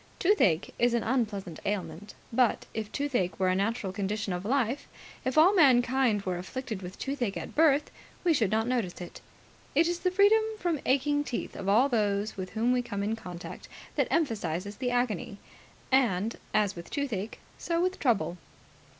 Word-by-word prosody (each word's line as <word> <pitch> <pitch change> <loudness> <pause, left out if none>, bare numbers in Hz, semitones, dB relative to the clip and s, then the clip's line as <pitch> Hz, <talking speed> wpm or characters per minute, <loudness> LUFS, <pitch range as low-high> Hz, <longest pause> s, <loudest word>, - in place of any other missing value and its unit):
Toothache 210 - +2
is 240 0 +3
an 235 - 0
unpleasant 210 -9 -2
ailment; 205 -1 -4 0.2
but, 245 -2 +2
if 215 -1 -4
toothache 245 -12 -1
were 185 -1 +3
a 185 - +2
natural 200 -1 -1
condition 200 0 -2
of 180 +1 -4
life, 255 +3 0 0.4
if 260 +2 -2
all 340 +6 +7
mankind 255 - +4
were 180 -2 -2
afflicted 220 +2 -5
with 180 +1 -8
toothache 255 -7 -2
at - - -6
birth, 300 -2 +3 0.3
we 345 -2 +4
should 225 -9 +2
not 220 +2 +1
notice 235 -8 -1
it. 175 - -9 0.5
It 325 +3 +4
is 345 0 -1
the 365 - +1
freedom 405 +4 +5 0.2
from 345 -6 -1
aching 290 +2 +2
teeth 250 - -4
of 195 0 -3
all 230 +7 +5
those 210 -4 0
with 185 -1 -5
whom 230 +3 +1
we 250 0 +2
come 205 -5 -4
in 215 +2 0
contact 180 -5 -9 0.3
that - - +2
emphasizes 205 - -1
the 255 -1 -1
agony. 240 -5 -1 0.5
And, 230 -5 +2 0.2
as 210 -2 +1
with 170 -1 -9
toothache, 230 -8 -3 0.2
so 335 -1 -1
with 365 +2 0
trouble. 210 - +1
225 Hz, 175 wpm, -29 LUFS, 200-270 Hz, 0.5 s, all